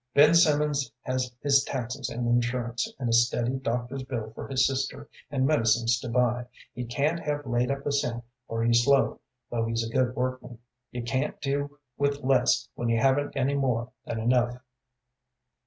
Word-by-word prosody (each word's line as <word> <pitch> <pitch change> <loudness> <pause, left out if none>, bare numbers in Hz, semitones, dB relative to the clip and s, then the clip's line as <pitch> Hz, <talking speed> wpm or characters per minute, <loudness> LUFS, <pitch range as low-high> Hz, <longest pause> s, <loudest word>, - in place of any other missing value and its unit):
"Ben 150 +3 +7
Simmons 150 -4 +3
has 130 -1 -2
his 140 -1 +4
taxes 125 -3 -4
and 120 0 -3
insurance, 120 0 0
and 130 - -3
a - - +1
steady 120 +2 +2
doctor's 125 +1 -3
bill 120 -5 -5
for - - -7
his 130 -1 +2
sister, 135 0 -2 0.2
and 135 -2 0
medicines 115 -4 +3
to 125 - -6
buy. 125 0 +1 0.3
He 125 - -5
can't 145 +7 0
have 145 -2 -3
laid 120 0 0
up 140 0 -3
a 145 - 0
cent, 120 -4 -1 0.2
for 115 0 -2
he's 115 0 +4
slow, 140 +1 +3 0.3
though 115 -1 0
he's 115 0 -1
a 115 - -9
good 130 -1 +1
workman. 130 -1 -3 0.3
You 125 -1 -5
can't 130 +4 -2
do 145 +1 -2 0.2
with 140 0 0
less 130 -1 +3
when 120 - -2
you 115 0 +2
haven't 135 +3 +1
any 135 +1 +1
more 125 -4 0
than 115 - -4
enough." 120 +1 +2
125 Hz, 175 wpm, -27 LUFS, 120-140 Hz, 0.3 s, Ben